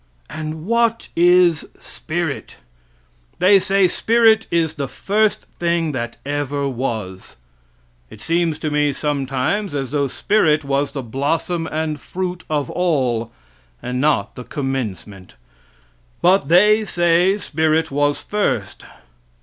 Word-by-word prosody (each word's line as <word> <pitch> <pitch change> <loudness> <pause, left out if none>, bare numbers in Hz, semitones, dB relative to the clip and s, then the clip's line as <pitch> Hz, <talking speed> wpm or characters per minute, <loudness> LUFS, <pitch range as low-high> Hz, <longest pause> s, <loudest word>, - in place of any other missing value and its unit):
And 155 +1 -6
what 230 +1 +1
is 175 -1 +4
spirit? 165 -3 -5 0.8
They 195 +2 +5
say 195 0 +2
spirit 225 +3 +3
is 165 -2 +1
the 140 -2 -4
first 205 +11 0
thing 170 -2 0
that 120 -4 -4
ever 145 0 -2
was. 110 - -5 0.7
It - - -13
seems 165 +3 0
to 155 - -1
me 150 -1 +1
sometimes 145 +6 -2
as 135 -2 -3
though 145 -1 +1
spirit 155 -2 +1
was 140 +1 -1
the 135 - -4
blossom 160 +7 -2
and 155 -1 -3
fruit 180 -1 -4
of 145 -3 -1
all, 130 -10 0 0.5
and 125 +1 -3
not 150 +1 +1
the 125 - -8
commencement. 105 - -5 0.8
But 185 +3 +3
they 210 +6 +5
say 175 0 +2
spirit 160 -5 0
was 145 +1 0
first. 210 0 -2
155 Hz, 120 wpm, -20 LUFS, 135-180 Hz, 0.8 s, They